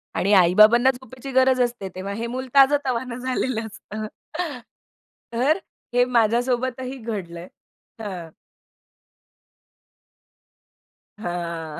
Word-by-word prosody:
आणि 200 Hz, +3 st, +2 dB
आई-बाबांना 215 Hz, +8 st, +6 dB
झोपेची 260 Hz, +1 st, -10 dB
गरज 260 Hz, 0 st, +4 dB
असते, 240 Hz, -6 st, -1 dB
तेव्हा 195 Hz, +2 st, -4 dB
हे 230 Hz, +3 st, -3 dB
मूल 255 Hz, +2 st, -4 dB
ताजं-तवाना 265 Hz, -3 st, +3 dB
झालेलं 255 Hz, -2 st, -2 dB
असतं. 215 Hz, 0 st, -7 dB, 1.3 s
तर 265 Hz, +9 st, +2 dB, 0.4 s
हे 245 Hz, 0 st, +5 dB
माझ्यासोबतही 250 Hz, +2 st, 0 dB
घडलंय. 185 Hz, -7 st, -6 dB, 0.5 s
हां. 180 Hz, -6 st, -6 dB, 2.9 s
हां. 170 Hz, -5 st, -4 dB
235 Hz, 85 wpm, -23 LUFS, 200-255 Hz, 2.9 s, आई-बाबांना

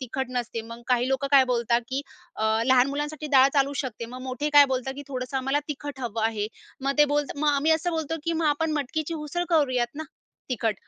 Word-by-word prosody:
तिखट 260 Hz, +1 st, -3 dB
नसते. 240 Hz, -2 st, -3 dB
मग 235 Hz, +1 st, -9 dB
काही 250 Hz, 0 st, +2 dB
लोकं 270 Hz, +1 st, 0 dB
काय 275 Hz, -2 st, +7 dB
बोलतात, 235 Hz, 0 st, +1 dB
की 270 Hz, +2 st, -2 dB, 0.3 s
अ, 220 Hz, -, -1 dB, 0.2 s
लहान 260 Hz, 0 st, +5 dB
मुलांसाठी 295 Hz, +2 st, -4 dB
डाळ 265 Hz, +1 st, +7 dB
चालू 275 Hz, 0 st, +2 dB
शकते, 230 Hz, -2 st, -5 dB
मग 250 Hz, +2 st, -9 dB
मोठे 260 Hz, +3 st, -3 dB
काय 290 Hz, -1 st, +9 dB
बोलतात, 265 Hz, +1 st, -3 dB
की 285 Hz, -, -6 dB
थोडंसं 255 Hz, 0 st, -4 dB
आम्हाला 270 Hz, +2 st, 0 dB
तिखट 290 Hz, -1 st, -6 dB
हवं 230 Hz, -3 st, -3 dB
आहे, 215 Hz, -2 st, 0 dB, 0.3 s
मग 275 Hz, +1 st, 0 dB
ते 295 Hz, -, +8 dB
बोलता 290 Hz, -1 st, -1 dB
मग 300 Hz, -, +2 dB
आम्ही 295 Hz, +3 st, +2 dB
असं 325 Hz, +2 st, 0 dB
बोलतो, 320 Hz, -1 st, -2 dB
की 335 Hz, -, 0 dB
मग 325 Hz, -1 st, 0 dB
आपण 310 Hz, +2 st, +1 dB
मटकीची 305 Hz, +3 st, -2 dB
उसळ 310 Hz, +3 st, -3 dB
करूयात 255 Hz, -7 st, +1 dB
ना, 315 Hz, -, -5 dB, 0.5 s
तिखट. 225 Hz, -4 st, 0 dB
270 Hz, 215 wpm, -26 LUFS, 250-295 Hz, 0.5 s, काय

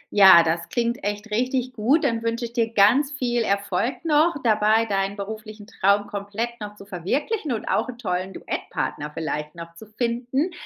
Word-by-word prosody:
Ja, 190 Hz, -4 st, +9 dB
das 165 Hz, +1 st, -2 dB
klingt 240 Hz, +1 st, -1 dB
echt 205 Hz, +1 st, -4 dB
richtig 255 Hz, +2 st, -1 dB
gut. 250 Hz, +9 st, +2 dB
Dann 230 Hz, -1 st, 0 dB
wünsche 230 Hz, +1 st, -2 dB
ich 230 Hz, -, -9 dB
dir 230 Hz, -2 st, 0 dB
ganz 240 Hz, +8 st, +4 dB
viel 245 Hz, -4 st, -1 dB
Erfolg 200 Hz, -, -1 dB
noch 315 Hz, +1 st, +3 dB
dabei, 220 Hz, 0 st, +3 dB
deinen 195 Hz, -1 st, -1 dB
beruflichen 215 Hz, +1 st, -7 dB
Traum 200 Hz, 0 st, +1 dB
komplett 205 Hz, +4 st, -4 dB
noch 210 Hz, 0 st, -7 dB
zu 200 Hz, -, -13 dB
verwirklichen 260 Hz, -, -2 dB
und 225 Hz, -, -3 dB
auch -, -, 0 dB
'n 240 Hz, -, -7 dB
tollen 185 Hz, -4 st, -3 dB
Duettpartner 150 Hz, -4 st, -4 dB
vielleicht 150 Hz, -1 st, -4 dB
noch 170 Hz, 0 st, -9 dB
zu 205 Hz, +6 st, -13 dB
finden. 245 Hz, -, -2 dB
220 Hz, 175 wpm, -23 LUFS, 200-240 Hz, -, Ja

